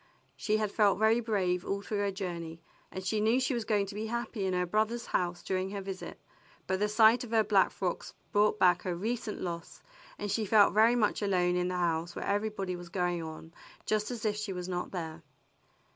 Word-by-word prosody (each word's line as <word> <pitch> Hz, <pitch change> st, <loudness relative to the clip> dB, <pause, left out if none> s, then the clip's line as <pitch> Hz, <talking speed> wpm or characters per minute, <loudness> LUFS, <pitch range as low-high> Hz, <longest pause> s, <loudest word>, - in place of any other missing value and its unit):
She 215 Hz, -1 st, 0 dB
had 215 Hz, -2 st, -1 dB
felt 205 Hz, -2 st, +3 dB
very 220 Hz, +2 st, +4 dB
brave 190 Hz, -6 st, 0 dB
all 200 Hz, 0 st, -3 dB
through 210 Hz, 0 st, -3 dB
her 200 Hz, 0 st, +1 dB
journey, 170 Hz, -4 st, -5 dB, 0.3 s
and 190 Hz, -, -6 dB
she 210 Hz, +2 st, 0 dB
knew 225 Hz, +4 st, +3 dB
she 260 Hz, +1 st, 0 dB
was 235 Hz, -3 st, -2 dB
going 210 Hz, -3 st, +1 dB
to 195 Hz, -, -8 dB
be 215 Hz, +2 st, -4 dB
happy 235 Hz, -3 st, -3 dB
in 185 Hz, -, 0 dB
her 180 Hz, 0 st, +1 dB
brother's 220 Hz, +5 st, 0 dB
house 175 Hz, -1 st, -1 dB
during 185 Hz, 0 st, -1 dB
her 200 Hz, 0 st, -4 dB
visit, 190 Hz, -1 st, -7 dB, 0.5 s
but 190 Hz, 0 st, -1 dB
the 210 Hz, +1 st, +1 dB
sight 225 Hz, +3 st, +5 dB
of 245 Hz, -, -8 dB
her 225 Hz, -1 st, +3 dB
black 205 Hz, -2 st, +4 dB
frocks 180 Hz, -2 st, -4 dB, 0.2 s
brought 210 Hz, +1 st, +3 dB
back 180 Hz, -3 st, +4 dB
her 180 Hz, -2 st, -2 dB
recent 220 Hz, +3 st, -3 dB
loss, 170 Hz, -2 st, -6 dB, 0.3 s
and 205 Hz, -1 st, -3 dB
she 220 Hz, +2 st, 0 dB
felt 205 Hz, 0 st, +5 dB
very 225 Hz, +3 st, +5 dB
much 220 Hz, -3 st, +1 dB
alone 180 Hz, -3 st, +2 dB
in 180 Hz, 0 st, +1 dB
this 180 Hz, 0 st, -2 dB
house 170 Hz, 0 st, -1 dB
where -, -, -4 dB
everybody 200 Hz, -2 st, -1 dB
was 175 Hz, -1 st, -9 dB
going 175 Hz, -1 st, -1 dB
on 160 Hz, 0 st, -8 dB, 0.3 s
just 215 Hz, -1 st, 0 dB
as 235 Hz, -3 st, -5 dB
if 210 Hz, -1 st, +1 dB
she 210 Hz, -1 st, -3 dB
were 180 Hz, -1 st, -5 dB
not 180 Hz, -1 st, -3 dB
there. 165 Hz, -3 st, -5 dB
200 Hz, 220 wpm, -30 LUFS, 180-215 Hz, 0.5 s, sight